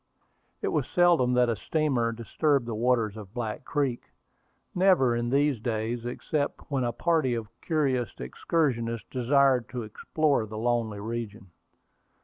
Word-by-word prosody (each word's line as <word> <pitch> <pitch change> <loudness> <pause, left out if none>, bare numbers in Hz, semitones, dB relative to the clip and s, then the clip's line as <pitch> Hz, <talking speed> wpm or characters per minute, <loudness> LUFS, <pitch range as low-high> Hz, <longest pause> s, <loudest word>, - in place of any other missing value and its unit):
It - - +1
was - - 0
seldom 170 -9 +3
that 125 0 +4
a 115 - 0
steamer 135 -5 0
disturbed 130 +4 0
the 115 - -4
waters 115 -2 +1
of 105 0 -10
Black 110 -3 -4
Creek, 140 -5 -1 0.7
never 180 -10 +4
in 120 0 -1
these 140 -1 +2
days, 115 +1 -2
except 145 +4 -3
when 135 -2 +1
a 120 - 0
party 155 -5 +1
of 110 -3 -5
curious 135 -7 0
excursionists 115 - -1
desired 130 -1 +3
to 125 -2 -4
explore 135 +3 0
the 110 +1 -7
lonely 115 -2 0
region. 110 -3 -6
120 Hz, 140 wpm, -27 LUFS, 115-140 Hz, 0.7 s, that